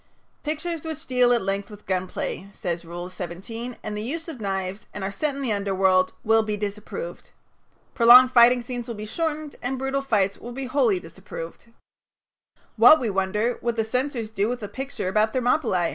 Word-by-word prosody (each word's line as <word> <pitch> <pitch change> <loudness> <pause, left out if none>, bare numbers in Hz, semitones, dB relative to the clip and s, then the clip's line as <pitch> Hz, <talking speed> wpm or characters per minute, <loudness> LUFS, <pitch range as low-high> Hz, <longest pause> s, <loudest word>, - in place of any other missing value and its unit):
"Pictures 315 +1 -3
which 320 -1 -5
deal 250 -3 +3
at 240 -3 +2
length 195 +2 -2
with 210 -1 -13
gun 185 -1 -1
play," 195 +1 -5
says 175 -3 -3
Rule 175 +1 -6
17, 190 +7 -7
"and 210 -1 -4
the 210 - -3
use 320 +9 -4
of 290 -8 -7
knives, 195 0 -3
and 205 - -4
are 190 - -2
set 285 +8 -2
in 280 - -4
the 235 -5 0
underworld, 190 -2 +2
will 225 0 +4
be 215 -1 -2
disapproved. 210 - -6 0.6
Prolonged 250 +1 +8
fighting 245 0 +6
scenes 245 -1 -5
will 235 - -5
be 210 0 -6
shortened 310 +3 -3
and 260 +2 -2
brutal 270 +1 -1
fights 200 -7 +1
will 240 +1 -8
be 270 +1 -4
wholly 250 -7 +2
disapproved." 165 +1 -9 1.1
What, 245 +8 +8
we 230 -4 -1
wonder, 210 +5 0
would 235 -1 -1
the 225 -1 0
censors 250 -1 -2
do 210 0 0
with 245 -2 -4
a - - -3
picture 265 -1 -5
about 215 +3 +2
Thermopylæ? 245 - +1
225 Hz, 190 wpm, -24 LUFS, 195-255 Hz, 1.1 s, Prolonged